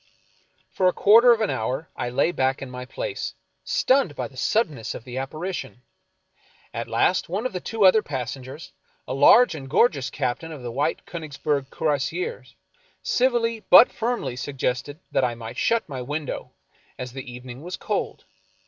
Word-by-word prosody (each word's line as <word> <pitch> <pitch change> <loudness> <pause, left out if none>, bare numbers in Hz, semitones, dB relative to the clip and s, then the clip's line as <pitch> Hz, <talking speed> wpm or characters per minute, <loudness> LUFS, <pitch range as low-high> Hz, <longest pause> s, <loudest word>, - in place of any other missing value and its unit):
For 185 - +2
a 180 - +3
quarter 230 +4 +7
of 230 -1 +3
an 215 - +1
hour 130 +8 -2
I 120 - -3
lay 140 +7 +2
back 135 -4 0
in 130 - -8
my 125 0 -7
place, - - -5 0.3
stunned 255 - +2
by - - -3
the 135 - -19
suddenness 145 - 0
of - - -8
the 125 +1 -5
apparition. 135 - -5 0.9
At - - -4
last 180 -1 +1
one 200 +7 -2
of 255 - -2
the 180 - -2
two 220 +2 0
other 200 +4 +7
passengers, 130 - -6 0.4
a - - -3
large 160 - +6
and 135 -4 -8
gorgeous 145 - +3
captain 140 +4 -3
of 145 -5 -9
the 120 - -4
White 140 +6 -1
Konigsberg 145 -4 -3
Cuirassiers, 160 - -2 0.5
civilly 240 -3 +1
but 245 - +9
firmly 230 - -2
suggested 135 +2 -3
that - - +2
I 120 -2 0
might 115 -1 -8
shut 230 0 +1
my 135 -4 -5
window, 145 +3 -4 0.5
as 125 -1 -6
the 130 -2 -7
evening 125 +1 -9
was 180 +3 -6
cold. - - -3
145 Hz, 165 wpm, -24 LUFS, 130-190 Hz, 0.9 s, but